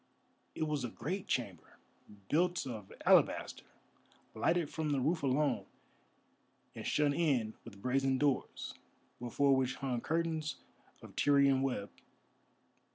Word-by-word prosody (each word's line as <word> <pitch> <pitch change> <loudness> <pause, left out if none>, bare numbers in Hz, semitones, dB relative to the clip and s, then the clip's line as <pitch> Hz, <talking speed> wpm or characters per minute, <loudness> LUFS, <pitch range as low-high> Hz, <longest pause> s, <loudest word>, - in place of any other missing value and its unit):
It - - -1
was 150 -3 -1
a 120 - -2
great 180 - -4
chamber, 100 -9 -3 0.5
built 175 - +1
of 110 -6 -7
alabaster, - - +3 0.7
lighted 165 +8 +1
from 160 -1 -2
the 140 -2 +1
roof 160 +6 +1
alone, 135 -1 +1 1.1
and - - -6
shut 145 -1 +2
in 135 -9 +1
with 100 0 -12
brazen 135 +1 +2
doors, 140 -1 -1 0.5
before 135 +3 +2
which 130 -1 0
hung 130 -4 -2
curtains 160 -1 -1 0.5
of - - -12
Tyrian 140 -2 +4
web. 125 -7 -2
140 Hz, 120 wpm, -34 LUFS, 125-155 Hz, 1.1 s, Tyrian